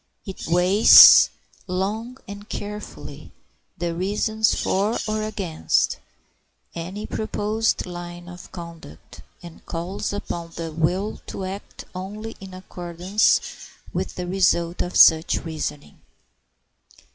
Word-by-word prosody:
It 195 - -7
weighs 180 +5 +8 0.4
long 210 +7 -3
and 205 +1 -10
carefully 210 +1 -8 0.4
the 170 -1 -2
reasons 210 +5 0
for 205 +4 0
or 215 0 -1
against 195 -7 -1 0.7
any 185 +5 -6
proposed 215 +1 -1
line 175 -1 -8
of 180 -1 -11
conduct, 170 - -11 0.2
and 170 -1 -12
calls 175 +3 -4
upon 170 -4 -6
the 165 -1 -5
will 180 +6 -1
to 190 - -5
act 195 +2 -8
only 210 +4 -7
in 190 -1 -10
accordance 180 +2 0 0.5
with - - -3
the 180 - -4
result 175 -2 +1
of 180 - -4
such 160 +1 +5
reasoning. 150 - -6
185 Hz, 110 wpm, -23 LUFS, 170-205 Hz, 0.7 s, weighs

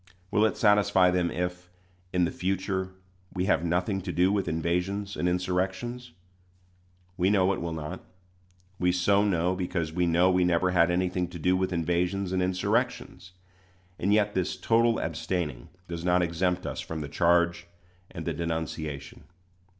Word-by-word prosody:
Will 105 - +4
it 110 - 0
satisfy 105 -3 +4
them 90 -1 +1
if, 90 0 -4 0.4
in 90 -1 +2
the - - -2
future, 95 0 -2 0.5
we 90 0 0
have 95 - +2
nothing 90 +3 0
to 90 0 -4
do 90 +2 +3
with 100 -1 0
invasions 90 +5 -1
and 90 - 0
insurrections? 95 +5 -2 1.0
We 90 +1 +2
know 100 -1 +3
it - - -4
will 85 0 -3
not. 75 -2 -6 0.8
We 90 0 +3
so 100 +3 +3
know, 90 -2 +1
because 85 -3 -2
we 90 0 +1
know 85 +3 +4
we 90 0 +3
never 90 +1 +2
had 85 -1 +4
anything 90 0 0
to 90 0 -9
do 90 +3 +2
with 95 0 0
invasions 90 +3 0
and 95 -1 0
insurrections; 95 +1 -1 0.7
and 100 - +1
yet 105 0 +3
this 95 -1 -1
total 115 0 +2
abstaining 75 -10 -3 0.2
does 85 -1 -5
not 90 0 +3
exempt 90 +2 -1
us - - -4
from 80 -1 -5
the 75 - -4
charge 85 +3 +2 0.4
and - - -7
the - - -1
denunciation. 80 -4 -4
90 Hz, 160 wpm, -27 LUFS, 85-95 Hz, 1.0 s, Will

